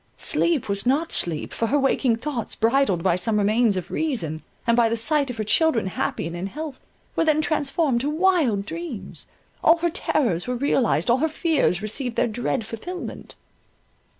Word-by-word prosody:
Sleep 330 -7 +1
was 200 +3 -2
not 300 +6 +1
sleep, 160 -3 -2
for 230 - -1
her 285 - +2
waking 270 -3 +2
thoughts, 245 0 -4
bridled 225 -6 +2
by 185 -3 +3
some 210 +4 +1
remains 210 0 +3
of 185 - -5
reason, 180 - -1 0.2
and 235 - +3
by 235 -1 +4
the 230 - 0
sight 285 +4 +1
of 245 - -5
her 215 - -1
children 225 +1 +2
happy 185 -3 -2
and 165 +1 -5
in 175 +3 -3
health, 300 +4 -6 0.4
were - - +2
then 310 -1 +3
transformed 300 -4 0
to 285 - -1
wild 305 - +2
dreams, 330 - -6 0.4
all 325 - +6
her 340 0 0
terrors 240 - 0
were 250 - -1
realized, 245 -2 +1
all 245 - +3
her 320 +3 +1
fears 305 - +1
received 235 +3 -2
their - - +2
dread 235 +1 -2
fulfilment. 355 +12 -7
245 Hz, 180 wpm, -24 LUFS, 215-305 Hz, 0.4 s, all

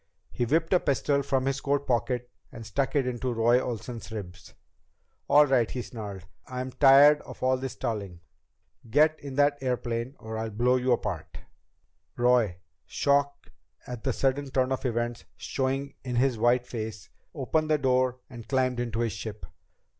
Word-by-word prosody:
He 120 - -1
whipped 160 +8 +1
a 180 - +5
pistol 140 -1 +1
from 135 -1 0
his 135 0 -1
coat 140 0 0
pocket 125 -1 -1 0.2
and 115 -2 -9
stuck 135 +8 -1
it 140 -3 +2
in 125 -1 -3
Roy 120 -1 +2
Olsen's 120 -1 -6
ribs. 95 -4 -8 0.7
"All 150 +1 +7
right," 130 -5 +2
he 125 - -4
snarled, 100 -6 -8 0.2
"I'm 130 0 -4
tired 145 +2 +7
of - - -11
all 130 0 +3
this 130 0 -5
stalling! 100 -6 -4 0.7
Get 155 +5 +4
in 140 -2 -8
that 145 0 +3
airplane 125 0 -2
or 110 0 -6
I'll 110 0 -3
blow 120 +4 +2
you 125 0 0
apart!" 105 -9 -2 0.8
Roy, 120 -7 +3 0.3
shock 140 0 0 0.3
at 125 -2 -7
the 135 - +1
sudden 135 +3 0
turn 130 0 +1
of 130 0 -1
events 120 0 -2
showing 135 +1 -2
in 125 -2 -4
his 130 +1 +2
white 120 +2 +3
face, 110 -4 -6 0.2
opened 155 +3 0
the 155 - +4
door 130 -2 +1
and 120 -3 -11
climbed 130 -2 +1
into 120 -2 -2
the 115 - +1
ship. 105 +2 -7
125 Hz, 165 wpm, -27 LUFS, 115-135 Hz, 0.8 s, All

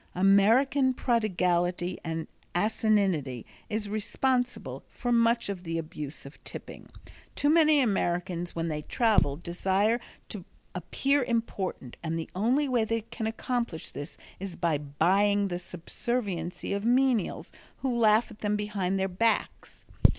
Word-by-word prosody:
American 235 +8 +4
prodigality 180 -6 +1
and 165 -1 -3 0.3
asininity 190 - +1 0.2
is 215 -1 -2
responsible 245 +4 -1
for 245 - -3
much 235 0 +3
of 195 -3 -4
the 165 -1 -3
abuse 155 -3 -6
of 140 - -13
tipping. - - -8 0.5
Too 290 +1 +3
many 310 -2 +6
Americans 175 -5 -1
when 165 0 -1
they 150 -2 -2
travel 210 - +2
desire 190 +7 +1 0.3
to 200 -4 -6 0.3
appear 270 - +1
important 225 - -3
and 165 0 -2
the 165 - -5
only 245 +10 +2
way 245 -4 +2
they 225 +1 -1
can 230 0 -5
accomplish 235 -6 -3
this 145 - -7 0.2
is 190 -2 -5
by 165 -4 +1
buying 195 +8 +2
the 175 -1 -3
subserviency 180 0 -3
of 200 0 -2
menials 245 -3 +2 0.3
who 260 -3 0
laugh 225 0 +4
at 215 - -13
them 210 0 0
behind 200 -2 -1
their 190 0 +1
backs. 220 +5 -1
200 Hz, 135 wpm, -28 LUFS, 175-235 Hz, 0.5 s, many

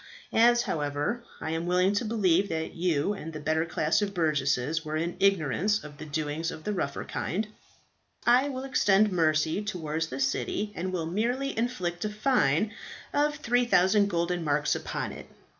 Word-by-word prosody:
As, 240 +1 +5
however, 150 +10 -2 0.2
I 160 - -3
am 165 +1 -2
willing 180 +2 +3
to 205 +4 0
believe 200 -4 +2
that 160 0 -3
you 170 +1 0
and 165 -5 -7
the 155 - -6
better 160 +2 0
class 160 0 +1
of 200 -1 -2
burgesses 150 -1 +1
were 155 0 -3
in 170 +2 -2
ignorance 195 +2 +2
of 145 -1 -11
the 155 - -7
doings 155 +2 -2
of 155 - -8
the 210 - -2
rougher 140 -7 -2
kind, 210 +5 -2 0.8
I 250 +4 +5
will 260 -1 -4
extend 210 -6 +3
mercy 160 +1 +2
towards 165 -5 -3
the 130 -3 -6
city, 205 +9 -1
and 185 +2 -3
will 175 -3 -2
merely 240 +10 -1
inflict 185 -7 -2
a 215 - -1
fine 210 - +1 0.4
of 295 +1 +2
3000 225 -7 +3
golden 170 -1 -1
marks 150 -1 +1
upon - - -3
it." - - -10
175 Hz, 170 wpm, -28 LUFS, 155-210 Hz, 0.8 s, As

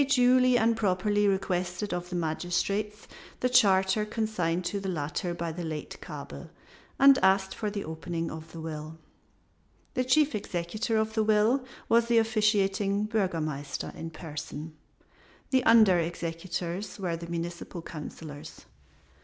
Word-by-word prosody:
They - - +4
duly 255 -1 +5
and 230 0 +3
properly 205 0 +1
requested 185 0 -1
of 175 0 -4
the 180 - -4
magistrates 180 +5 -2 0.3
the 250 - +1
charter 200 -4 +4
consigned 210 -6 -1
to 200 - -1
the 195 -1 -4
latter 170 +1 -2
by 170 -1 -3
the 175 +2 -6
late 155 -2 -6
Kabel, - - -8 0.5
and 275 -1 +7
asked 190 0 +3
for 215 - -3
the 205 -1 -4
opening 165 +1 -4
of 160 0 -9
the 165 - -9
will. 155 0 -6 1.0
The 255 - +1
chief 290 +3 +3
executor 210 +3 -2
of 220 0 0
the 220 -1 +2
will 215 +5 +3 0.2
was 235 0 +4
the 235 -1 +3
officiating 210 -2 +2
Burgomaster 165 -10 -2
in 165 - -6
person, 155 -1 -7 0.8
the 260 -2 +3
under 215 -6 +6
executors 170 +2 -4
were 180 -4 -2
the 170 0 -7
Municipal 170 0 -5
Councilors. 150 -2 -9
190 Hz, 140 wpm, -28 LUFS, 170-215 Hz, 1.0 s, and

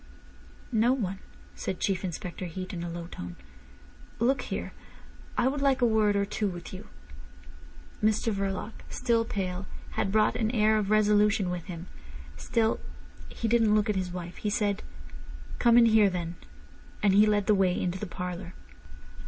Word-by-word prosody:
"No 235 +2 +4
one," 195 -7 -2 0.3
said 190 - -4
Chief 195 -1 0
Inspector 180 0 -5
Heat 185 +2 -5
in 170 -1 -4
a 175 - -4
low 170 0 -5
tone. 90 - -8 0.8
"Look 255 +4 +2
here, - - -4 0.6
I 245 - +3
would 275 +1 -1
like 275 -1 +3
a 245 - +4
word 215 -3 +3
or 200 0 +2
two 210 +1 -1
with 175 -1 -6
you." 185 - -8 1.2
Mr 215 +1 +2
Verloc, 195 +1 -2 0.2
still 235 -2 +1
pale, 190 -3 -3 0.2
had 195 - -1
brought 215 +1 +3
an 220 -2 0
air 215 0 +4
of 200 -2 -2
resolution 210 -2 +3
with 175 -2 -4
him. 170 -2 -7 0.5
Still 220 - 0 0.5
he 230 - -3
didn't 225 -2 +4
look 210 0 +2
at - - -3
his 185 -1 -1
wife. 175 -1 -7
He 210 - -2
said: 205 -1 0 0.8
"Come 235 -1 +5
in 240 - +8
here, 220 -3 +5
then." 175 -2 -3 0.7
And 200 -2 +5
he 210 +2 +6
led 205 -1 +2
the 210 - +4
way 190 -3 +2
into 180 +1 -2
the 210 - -4
parlour. 180 0 -6
205 Hz, 170 wpm, -28 LUFS, 180-220 Hz, 1.2 s, in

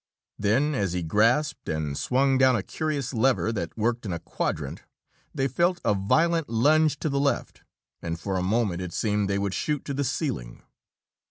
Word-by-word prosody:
Then, 125 +9 +2
as 100 -9 -1
he 90 -1 -2
grasped 115 - +1
and 75 -2 -2
swung 130 - +2
down 130 -1 +5
a 105 - -1
curious 145 - -3
lever 120 -1 +2
that 90 -5 -4
worked 115 +2 0
in 100 - -4
a 85 - -2
quadrant, - - -4 0.5
they 135 - 0
felt 175 +7 +1
a - - +4
violent 160 - +1
lunge 150 +6 +3
to - - 0
the 140 0 0
left, 140 0 -1 0.4
and 85 -1 -4
for 95 +2 -3
a 90 - 0
moment 95 -2 0
it 90 -2 -5
seemed 105 -2 0
they 100 - +1
would 100 -1 -1
shoot 150 +6 -2
to 140 - -3
the 140 +1 -1
ceiling. 120 - -3
115 Hz, 185 wpm, -26 LUFS, 95-140 Hz, 0.5 s, down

